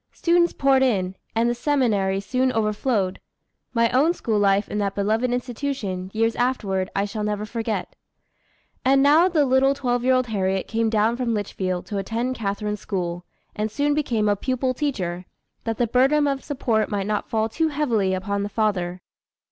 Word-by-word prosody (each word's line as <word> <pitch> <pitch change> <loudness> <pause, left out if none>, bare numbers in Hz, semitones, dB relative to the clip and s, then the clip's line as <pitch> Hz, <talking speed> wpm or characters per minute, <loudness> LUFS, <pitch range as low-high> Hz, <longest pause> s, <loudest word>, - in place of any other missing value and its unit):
Students 345 0 +3
poured 270 -1 +3
in, 190 -8 +1 0.2
and 230 +1 +2
the 240 - +2
seminary 230 -8 +1
soon 255 +5 0
overflowed. 215 -2 0 0.5
My 230 -1 +3
own 300 +7 +3
school 220 -2 -1
life 200 0 +3
in 210 - -3
that 200 -1 -1
beloved 220 +5 +1
institution, 245 -7 -3
years 225 +1 +1
afterward, 200 -7 0
I 200 - +1
shall 210 +1 -4
never 210 0 -2
forget. 220 -3 -3 0.9
And 270 +1 +4
now 310 +6 +5
the 310 -5 +2
little 265 +1 +3
twelve 245 -3 -1
year 260 +1 +4
old 255 0 +2
Harriet 195 -4 -1
came 225 0 0
down 220 +2 +2
from 240 -3 0
Litchfield 185 -3 -3
to 205 -2 -3
attend 230 +6 -2
Catharine's 210 -2 -3
school, 175 -3 -3 0.3
and 215 +1 -1
soon 290 +6 0
become 240 -8 0
a 205 - +3
pupil 255 +4 -1
teacher, 185 - -3 0.4
that 225 -2 -2
the 240 - +2
burden 270 +6 +3
of 275 -1 -1
support 245 -7 0
might 200 -2 -2
not 210 0 -2
fall 220 -1 +1
too 320 +9 0
heavily 235 -11 0
upon 200 +2 -2
the 200 - -3
father. 185 -4 -1
225 Hz, 175 wpm, -23 LUFS, 200-260 Hz, 0.9 s, now